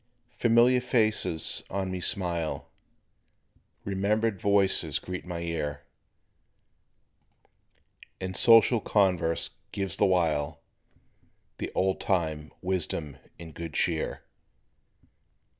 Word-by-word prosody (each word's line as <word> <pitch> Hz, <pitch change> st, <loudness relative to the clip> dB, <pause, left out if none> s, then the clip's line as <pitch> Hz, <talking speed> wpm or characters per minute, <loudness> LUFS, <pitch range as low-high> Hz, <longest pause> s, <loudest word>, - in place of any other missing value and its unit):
Familiar 120 Hz, +2 st, +4 dB
faces 110 Hz, -, 0 dB
on 95 Hz, -1 st, -2 dB
me 90 Hz, -1 st, -4 dB
smile, 85 Hz, -4 st, -2 dB, 1.1 s
Remembered 100 Hz, +2 st, 0 dB
voices 100 Hz, -2 st, +2 dB
greet 90 Hz, -1 st, -6 dB
my 85 Hz, -1 st, -4 dB
ear, 75 Hz, -4 st, -3 dB, 2.4 s
And 95 Hz, 0 st, -4 dB
social 115 Hz, +2 st, +6 dB
converse 90 Hz, -6 st, +1 dB, 0.2 s
gives 95 Hz, -2 st, -3 dB
the -, -, +4 dB
while, 80 Hz, -6 st, 0 dB, 1.0 s
The -, -, -4 dB
old 95 Hz, 0 st, +1 dB
time 80 Hz, -5 st, -1 dB
wisdom 85 Hz, -6 st, -2 dB, 0.2 s
and 80 Hz, -2 st, -10 dB
good 80 Hz, -2 st, -7 dB
cheer. 80 Hz, -3 st, -1 dB
95 Hz, 90 wpm, -28 LUFS, 80-100 Hz, 2.4 s, social